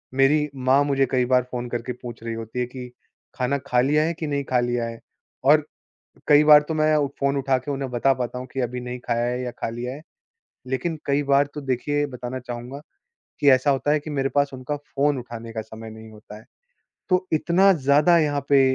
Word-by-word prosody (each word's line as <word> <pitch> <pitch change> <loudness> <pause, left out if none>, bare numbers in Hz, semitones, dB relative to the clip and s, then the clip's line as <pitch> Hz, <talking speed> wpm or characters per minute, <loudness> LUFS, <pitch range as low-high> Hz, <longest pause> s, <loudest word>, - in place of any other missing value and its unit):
मेरी 150 +2 +3
माँ 130 +2 +3
मुझे 135 -1 +2
कई 125 -1 +2
बार 125 0 +3
फ़ोन 125 -1 -4
करके 120 +1 -4
पूछ 120 -2 -10
रही 115 -1 -4
होती 115 +2 -6
है 125 - +1
कि 125 0 -9 0.4
खाना 130 +2 0
खा 125 - +2
लिया 150 +4 +2
है 165 +1 0
कि 155 - -3
नहीं 140 -1 -1
खा 125 -1 +3
लिया 120 -1 -1
है? 115 0 -7 0.4
और 150 +2 +5 0.6
कई 150 0 +6
बार 150 -1 +9
तो 160 - -1
मैं 155 0 +3 0.2
फ़ोन 140 0 +1
उठा 135 -1 +1
के 145 +3 -7
उन्हें 135 -2 -4
बता 125 +3 +2
पाता 125 0 -4
हूँ 130 - -7
कि 135 - -3
अभी 125 0 -3
नहीं 125 0 -6
खाया 120 -1 -1
है 125 +1 -2
या 125 - -3
खा - - -1
लिया 120 +2 -5
है। 150 - -11 0.7
लेकिन 155 +5 -2
कई 140 +1 +1
बार 140 +1 +3
तो 150 - -6
देखिए 145 +3 -1
बताना 125 0 -6
चाहूँगा 125 +3 -7 0.6
कि 145 - +5
ऐसा 130 +2 +4
होता 140 +2 0
है 150 - +3
कि 155 - -9
मेरे 135 -1 0
पास 140 0 +3
उनका 130 +3 -4
फ़ोन 145 0 -1
उठाने 115 -1 -8
का 110 - -3
समय 110 +1 -10
नहीं 110 0 -12
होता 105 0 -12
है। - - -18 0.7
तो 185 0 +2
इतना 180 +5 +4
ज़्यादा 150 +3 +4
यहाँ 145 -2 +1
पे 140 -1 +5
135 Hz, 220 wpm, -23 LUFS, 125-145 Hz, 0.7 s, बार